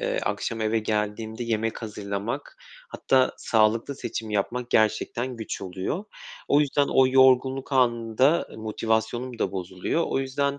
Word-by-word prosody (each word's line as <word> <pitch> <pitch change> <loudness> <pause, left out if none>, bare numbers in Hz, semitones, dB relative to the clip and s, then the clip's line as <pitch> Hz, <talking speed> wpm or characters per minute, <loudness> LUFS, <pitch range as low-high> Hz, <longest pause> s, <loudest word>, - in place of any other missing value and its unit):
eee, - - -1
akşam 115 -1 -2
eve 110 +1 +1
geldiğimde 110 +2 -2
yemek 115 0 -2
hazırlamak, 105 - -5 0.3
hatta 130 - +2
sağlıklı 110 +4 +1
seçim 110 -5 -5
yapmak 120 +4 -2
gerçekten 115 +3 +1
güç 110 - -5
oluyor. 95 - -4 0.4
O 145 - +5
yüzden 145 -1 +2
o 130 -1 +5
yorgunluk 130 +1 +3
anında 125 +3 +2
motivasyonum 110 +3 -2
da 95 - -1
bozuluyor. 95 - -2
O - - -1
yüzden, 140 +1 -1
115 Hz, 130 wpm, -25 LUFS, 110-130 Hz, 0.4 s, O